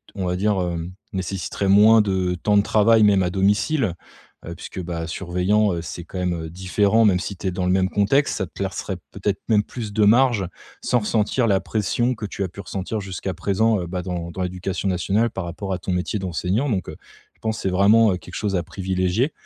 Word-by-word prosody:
on 95 Hz, -2 st, -3 dB
va 90 Hz, 0 st, 0 dB
dire, 100 Hz, +1 st, +1 dB
hem, 85 Hz, -1 st, -3 dB, 0.2 s
nécessiterait 95 Hz, +1 st, -3 dB
moins 105 Hz, +3 st, +7 dB
de 95 Hz, -3 st, 0 dB
temps 105 Hz, -1 st, +3 dB
de 100 Hz, -, +4 dB
travail. 110 Hz, +1 st, +4 dB
Même 100 Hz, -2 st, +5 dB
à 90 Hz, -, +1 dB
domicile, 100 Hz, -, +1 dB, 0.5 s
heu, 85 Hz, 0 st, -6 dB
puisque, 95 Hz, -, -7 dB
bah, 85 Hz, -1 st, -4 dB
surveillant, 95 Hz, +4 st, +1 dB
heu, 85 Hz, -, -3 dB
c'est 85 Hz, +1 st, -7 dB
quand 95 Hz, -, -8 dB
même, 90 Hz, -1 st, 0 dB
heu, 80 Hz, -, -7 dB
différent, 100 Hz, +5 st, +2 dB
même 95 Hz, -3 st, +4 dB
si 100 Hz, +2 st, -5 dB
tu -, -, -4 dB
es -, -, 0 dB
dans 90 Hz, 0 st, -2 dB
le -, -, +2 dB
même 95 Hz, 0 st, +2 dB
contexte. 120 Hz, +10 st, +2 dB
Ça 95 Hz, -, -2 dB
te -, -, -27 dB
laisserait 95 Hz, -1 st, -4 dB
peut-être 100 Hz, 0 st, -2 dB
même 105 Hz, -2 st, +5 dB
plus 110 Hz, -2 st, -6 dB
de 110 Hz, -, +2 dB
marge, 120 Hz, -3 st, +4 dB, 0.4 s
sans 125 Hz, -, +2 dB
ressentir 110 Hz, +3 st, +1 dB
la 100 Hz, -3 st, +3 dB
pression 120 Hz, +5 st, -1 dB
que 110 Hz, -, -6 dB
tu 100 Hz, -1 st, -4 dB
as -, -, -1 dB
pu 95 Hz, +3 st, -9 dB
ressentir 100 Hz, +3 st, -4 dB
jusqu'à 95 Hz, -1 st, -4 dB
présent, 100 Hz, +3 st, +1 dB
heu, 85 Hz, -, -5 dB
bah, 90 Hz, +1 st, -3 dB
dans 85 Hz, -1 st, -4 dB
dans 95 Hz, -, -5 dB
l'éducation 90 Hz, +1 st, -3 dB
nationale, 100 Hz, +6 st, +1 dB
par 95 Hz, -, -5 dB
rapport 95 Hz, +3 st, -4 dB
à -, -, -1 dB
ton 95 Hz, -, -4 dB
métier 90 Hz, +4 st, -1 dB
d'enseignant. 95 Hz, -, -1 dB
Donc, 95 Hz, -4 st, -2 dB
heu, -, -, -7 dB, 0.4 s
je -, -, -34 dB
pense 110 Hz, 0 st, -2 dB
c'est 95 Hz, -, -1 dB
vraiment 100 Hz, +2 st, +4 dB
quelque 90 Hz, -, -13 dB
chose 100 Hz, -2 st, -1 dB
à 85 Hz, -, 0 dB
privilégier 95 Hz, -, -1 dB
95 Hz, 220 wpm, -22 LUFS, 90-105 Hz, 0.5 s, moins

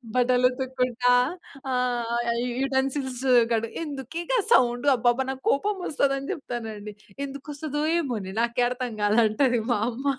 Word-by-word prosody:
బట్టలు 250 Hz, 0 st, +3 dB
ఉతుక్కుంటా 250 Hz, -1 st, 0 dB, 0.6 s
ఆహ్, 240 Hz, -2 st, 0 dB, 0.2 s
you 250 Hz, -, -2 dB
utensils 265 Hz, -1 st, -1 dB, 0.3 s
కడ్ 230 Hz, 0 st, +1 dB, 0.2 s
ఎందుకే 290 Hz, +1 st, -5 dB
గా -, -, +3 dB, 0.2 s
సౌండ్, 245 Hz, 0 st, +3 dB
అబ్బా‌బా 240 Hz, +2 st, +2 dB
నాకు 265 Hz, 0 st, -8 dB
కోపం 410 Hz, +9 st, +1 dB
వస్తది, 280 Hz, -2 st, +1 dB
అని 275 Hz, -, -7 dB
చెప్తానండి, 220 Hz, -6 st, -6 dB, 0.3 s
"ఎందుకు 275 Hz, +1 st, -9 dB
వస్తదో! 295 Hz, 0 st, -3 dB, 0.2 s
ఏమో‌నే! 220 Hz, -, -3 dB
నాకే 235 Hz, +1 st, +1 dB
అర్థం 250 Hz, -1 st, -4 dB
కాలంటది" 225 Hz, +3 st, +3 dB
మా 240 Hz, -, +2 dB
అమ్మ 250 Hz, +3 st, -7 dB
250 Hz, 135 wpm, -25 LUFS, 235-270 Hz, 0.6 s, బట్టలు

